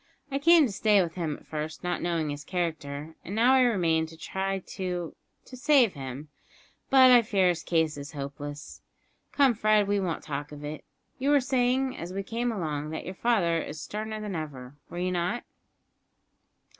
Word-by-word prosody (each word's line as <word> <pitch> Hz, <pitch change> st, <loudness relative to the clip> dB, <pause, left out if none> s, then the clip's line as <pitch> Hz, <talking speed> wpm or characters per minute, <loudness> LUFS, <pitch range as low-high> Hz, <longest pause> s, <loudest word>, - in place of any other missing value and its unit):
I 275 Hz, -, 0 dB
came 330 Hz, +1 st, +6 dB
to 235 Hz, -, -3 dB
stay 210 Hz, +1 st, +3 dB
with 165 Hz, -1 st, -5 dB
him 165 Hz, -5 st, -3 dB
at -, -, -20 dB
first, 155 Hz, +1 st, -5 dB
not 180 Hz, 0 st, -1 dB
knowing 165 Hz, -3 st, -1 dB
his 145 Hz, +1 st, -6 dB
character, 160 Hz, -3 st, -3 dB
and 195 Hz, -, -6 dB
now 240 Hz, +4 st, +5 dB
I 265 Hz, -, +6 dB
remain 170 Hz, -9 st, +2 dB
to 160 Hz, 0 st, -13 dB
try 195 Hz, +3 st, -2 dB
to 180 Hz, -3 st, -5 dB, 0.3 s
to 255 Hz, -, -11 dB
save 255 Hz, -4 st, +4 dB
him; 135 Hz, +1 st, -7 dB, 0.6 s
but 260 Hz, -2 st, +7 dB
I 245 Hz, -1 st, +8 dB
fear 195 Hz, -5 st, +2 dB
his 175 Hz, -1 st, -1 dB
case 160 Hz, -3 st, 0 dB
is 140 Hz, +2 st, -8 dB
hopeless. 145 Hz, +1 st, -7 dB, 0.5 s
Come, 275 Hz, -3 st, +4 dB
Fred, 215 Hz, -1 st, +3 dB
we 205 Hz, 0 st, +1 dB
won't 180 Hz, -4 st, -2 dB
talk 145 Hz, 0 st, -5 dB
of 150 Hz, 0 st, -9 dB
it. 150 Hz, +1 st, -6 dB, 0.4 s
You 270 Hz, +2 st, 0 dB
were 290 Hz, 0 st, +6 dB
saying, 260 Hz, 0 st, +1 dB
as 175 Hz, -3 st, -6 dB
we 195 Hz, +1 st, -3 dB
came 235 Hz, +4 st, -2 dB
along, 155 Hz, -7 st, -3 dB
that 160 Hz, -, -5 dB
your 185 Hz, -, -5 dB
father 185 Hz, -7 st, +1 dB
is 150 Hz, -, -7 dB
sterner 215 Hz, +9 st, -5 dB
than 210 Hz, -3 st, -5 dB
ever, 140 Hz, -4 st, -6 dB
were 175 Hz, -, -8 dB
you 180 Hz, +1 st, -1 dB
not?" 180 Hz, +7 st, -1 dB
180 Hz, 190 wpm, -28 LUFS, 155-225 Hz, 0.6 s, I